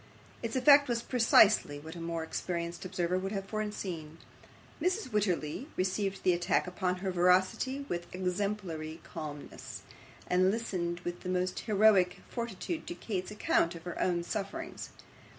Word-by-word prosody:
Its 230 +1 -3
effect 285 +2 +7
was 235 -1 0
precisely 220 - +5
what 160 +3 -9
a 170 - -7
more 165 -1 -2
experienced 170 +2 -3
observer 185 -1 0
would 195 +1 -3
have 195 -2 -3
foreseen. 195 -7 -4 0.6
Mrs. 365 +1 0
Wititterly 195 - 0
received 195 +1 -1
the 180 - +5
attack 175 0 +1
upon 180 0 -1
her 190 - +1
veracity 185 +10 +2
with 175 0 -3
exemplary 180 -4 -2
calmness, 150 -3 -7 0.4
and 185 +1 +3
listened 180 -5 -2
with 175 0 -4
the 180 - -6
most 180 0 0
heroic 205 -4 +4
fortitude 235 - -4
to 345 - -4
Kate's 185 - -3
account 190 -4 +1
of 165 - -9
her 175 - -5
own 175 -2 +1
sufferings. 225 - -4
185 Hz, 145 wpm, -31 LUFS, 175-215 Hz, 0.6 s, effect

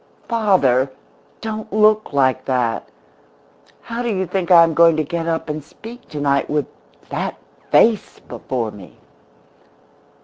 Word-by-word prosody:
"Father, 180 - +2 0.5
don't 220 -1 -5
look 215 +1 +3
like 135 -3 +1
that! 125 -3 -1 0.9
How 235 +1 -5
do 240 - -2
you 190 -3 -1
think 180 0 -3
I 170 -2 +8
am 165 -1 +1
going 165 0 +5
to 155 - +1
get 165 +2 -4
up 165 -1 -2
and 150 -1 -4
speak 230 - -13
tonight 145 -2 0
with 150 -1 0 0.4
that - - -3 0.3
face 225 -2 +3
before 120 -4 -4
me?" 100 -3 -14
165 Hz, 135 wpm, -19 LUFS, 140-215 Hz, 0.9 s, I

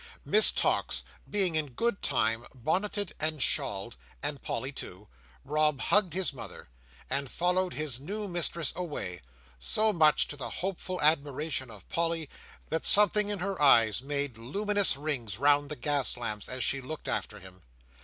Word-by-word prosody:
Miss 430 - +9
Tox, - - -1 0.3
being, 195 -4 +1
in 150 -4 -3
good 230 - -2
time, 115 -3 0
bonneted 185 - -2
and 155 0 0
shawled, 100 -3 -2 0.3
and 145 -1 -3
Polly 135 - -5
too, 105 -6 -9 0.4
Rob 150 -2 0
hugged 195 0 +1
his 185 -4 0
mother, 125 - -10 0.4
and 135 0 -2
followed 180 +1 -1
his 150 -5 +1
new 205 +9 -6
mistress 170 -3 -2
away; 145 - -6 0.4
so 215 - +2
much 155 -4 +3
to - - -6
the 140 - -7
hopeful 185 0 -5
admiration 145 -3 0
of 105 -3 -13
Polly, 165 -4 -1 0.4
that 160 - -3
something 210 0 +7
in 205 - -3
her 190 -1 -5
eyes 115 -6 +5
made 140 -3 -4
luminous 200 - +1
rings 130 -9 -4
round 145 +2 +3
the 150 - -4
gas 140 0 0
lamps 110 -4 -4
as 130 0 -2
she 140 - +1
looked 155 +4 -8
after - - -3
him. 95 -1 -15
150 Hz, 155 wpm, -28 LUFS, 130-180 Hz, 0.4 s, Miss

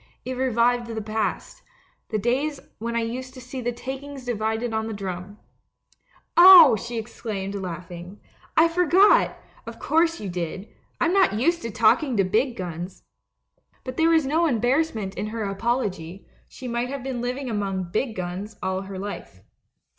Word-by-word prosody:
It 255 - -3
revived 245 -1 +1
the 225 -1 -4
past 220 - -3 0.2
— - - -40
the 215 - -1
days 270 +7 0 0.2
when 235 +1 -3
I 235 - +1
used 255 +3 -5
to - - -9
see 255 +1 -7
the 245 0 -1
takings 265 +2 -7
divided 220 0 -2
on 220 0 -1
the 220 - -4
drum. 190 0 -6 0.5
" - - -36
'Oh,' 345 -8 +10
she 235 +3 -5
exclaimed, 215 -3 -5
laughing, 180 0 -7 0.4
'I 325 - +7
forgot 360 +4 +5
1 - - -16 0.3
Of - - -7
course 330 +1 +1
you 205 - -5
did 180 +2 -5 0.2
— - - -41
I'm 335 +1 +2
not 385 - +4
used 335 +11 +1
to 230 - -4
talking 230 +4 +2
to 195 - +4
big 230 +7 +1
guns.' 175 0 -6 0.8
But 255 -1 -7
there 325 0 +4
was 320 -3 +4
no 320 +5 +2
embarrassment 245 -4 0
in 205 +2 -4
her 220 0 -4
apology 195 -4 -3
— - - -34
she 260 - -9
might 240 +1 -2
have 275 -1 -5
been 260 -3 -3
living 255 +2 -3
among 195 -5 -2
'big 220 +2 -1
guns' 185 +4 -5
all 190 0 -1
her 195 0 -8
life. 185 - -7
230 Hz, 175 wpm, -24 LUFS, 200-265 Hz, 0.8 s, Oh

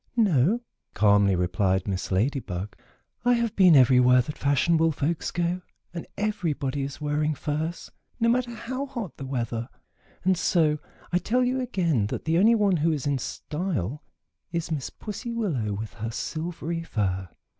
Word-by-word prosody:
"No," 200 - +3 0.3
calmly 100 -2 +4
replied 95 +2 +1
Miss 95 -1 -3
Lady 120 +9 +1
Bug. 95 -3 -6 0.5
"I 245 0 +4
have 235 -2 0
been 185 -4 +7
everywhere 125 -1 +6
that 150 +4 -6
fashionable 160 +4 +2
folks 155 +2 -1
go, 175 +1 -1 0.3
and 170 - -6
everybody 155 -10 -1
is 135 0 -5
wearing 150 0 0
furs, 155 +4 -3 0.3
no 230 - +3
matter 245 +1 +2
how 250 +4 -4
hot 235 - -6
the 135 - -6
weather; 120 -2 -3 0.5
and 190 0 +3
so 160 -3 +2 0.3
I 175 - +3
tell 250 +6 +1
you 255 +1 +1
again 170 - +1
that - - -5
the 165 +1 +2
only 225 +4 +6
one 200 -4 +3
who 160 +2 +2
is 150 -4 -2
in 140 -2 +1
style 150 - -3 0.5
is 170 0 -3
Miss 145 -5 -2
Pussy 230 +3 -6
Willow 155 - -1
with 105 +2 -5
her 110 0 -4
silvery 165 +7 -4
fur." 95 - -2
155 Hz, 160 wpm, -26 LUFS, 125-190 Hz, 0.5 s, been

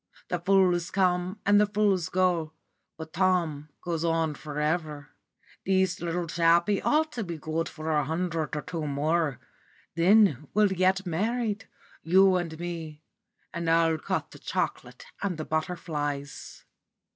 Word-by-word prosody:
The 180 - -1
fools 180 -1 +3
come 185 +1 0
and 205 +1 +5
the 210 - +3
fools 200 -4 +1
go, 175 -4 +1 0.4
but 160 0 -9
Tom 170 -6 0
goes 170 -2 -2
on 165 -2 +1
for 150 0 -7
ever. 150 -2 -2 0.5
This 190 -1 +1
little 175 0 -2
chappie 170 +4 +2
ought 310 +1 +2
to 240 -6 -4
be 170 -3 -5
good 160 +2 -3
for 160 0 -5
a 150 -1 +2
hundred 165 +1 -2
or 150 - -3
two 165 -4 -4
more 145 0 0 0.5
then 170 - +4
we'll 210 -1 +5
be 185 0 +3
married, 210 +5 -1 0.3
you 190 +3 +5
and 165 -3 -4
me, 165 -3 -6 0.5
and 170 -1 -2
I'll 165 -1 +3
cut - - -3
the - - -13
chocolate - - -3 0.2
and 195 -5 -2
the 155 - -4
butterflies." 150 -4 -4
170 Hz, 145 wpm, -27 LUFS, 155-185 Hz, 0.5 s, and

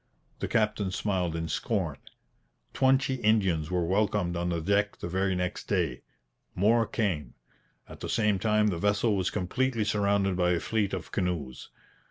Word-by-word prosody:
The - - -2
captain 105 -3 +1
smiled 95 -3 -1
in 80 0 -3
scorn. - - -1 0.8
Twenty 130 0 +2
Indians 95 -8 +2
were 90 -2 0
welcomed 90 -2 +1
on 85 0 -1
the 85 -1 -1
deck 100 +4 +1
the - - -5
very 95 +2 0
next 90 0 -3
day. 85 - -1 0.5
More 115 +5 +3
came. 95 -10 -2 0.5
At - - -11
the - - -5
same 105 -3 +2
time 105 +1 +2
the 85 -4 -2
vessel 105 +3 +2
was 95 -2 0
completely 115 +5 -1
surrounded 100 -2 +1
by 90 0 +2
a 85 - +1
fleet 105 -1 -1
of 90 - -8
canoes. 85 -9 -3
95 Hz, 160 wpm, -28 LUFS, 90-105 Hz, 0.8 s, More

